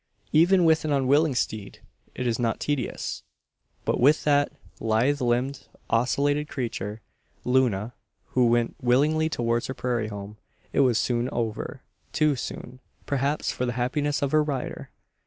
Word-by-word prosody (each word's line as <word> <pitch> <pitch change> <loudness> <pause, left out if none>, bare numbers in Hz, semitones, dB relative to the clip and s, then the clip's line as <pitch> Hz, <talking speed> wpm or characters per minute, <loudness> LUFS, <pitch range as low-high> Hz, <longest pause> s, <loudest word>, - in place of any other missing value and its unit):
Even 175 +3 +5
with 160 0 +4
an 155 - -1
unwilling 140 +2 +3
steed 110 -4 -3 0.4
it 125 - -3
is 120 -1 0
not 115 -2 0
tedious; 145 -4 -2 0.6
but - - 0
with 145 +5 +4
that 145 -1 +3 0.3
lithe 120 +6 +1
limbed, 125 +3 0 0.2
ocellated 145 +5 +1
creature, 110 -4 -4 0.4
Luna, 125 -4 +1 0.4
who 125 -2 +3
went 120 0 +1
willingly 150 +6 +3
towards 120 -4 0
her 130 - -5
prairie 120 -4 -1
home, 105 0 -8 0.3
it - - +1
was 125 -5 +4
soon 120 +2 0
over 115 -4 -4 0.3
too 150 -2 +3
soon, 125 0 -7 0.3
perhaps, 140 +2 0
for 125 - -2
the 120 - -1
happiness 145 +4 0
of 140 - 0
her 155 - +4
rider. 145 -4 -4
125 Hz, 145 wpm, -26 LUFS, 120-145 Hz, 0.6 s, Even